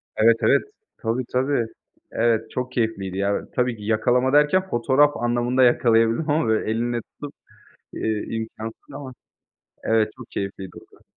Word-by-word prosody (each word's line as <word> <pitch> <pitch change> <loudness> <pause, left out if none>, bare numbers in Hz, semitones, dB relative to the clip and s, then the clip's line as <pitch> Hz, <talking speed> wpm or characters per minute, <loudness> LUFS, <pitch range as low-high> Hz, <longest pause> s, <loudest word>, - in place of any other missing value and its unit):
Evet, 115 +1 +5
evet. - - +4 0.4
Tabii, 115 +2 -2
tabii. 130 -2 +1 0.4
Evet, 115 -1 +1
çok 125 0 -3
keyifliydi 110 -6 -2
ya. 100 +1 0
Tabii 125 -2 0
ki 105 - -11
yakalama 125 +5 +2
derken 165 +6 +3
fotoğraf 140 +4 +3
anlamında 120 +2 +1
yakalayabildim 115 +3 +3
ama, 155 -1 +2
böyle, 110 0 +1
elinle 120 +1 -1
tutup, 145 +5 -11 0.6
iii, 110 -1 -2
imkânsız 110 +3 -7
ama. 140 -2 -8 0.7
Evet, 110 -1 +2
çok 130 -3 -11
keyifliydi 95 -1 -5
o - - -16
da. - - -28
120 Hz, 145 wpm, -23 LUFS, 110-130 Hz, 0.7 s, Evet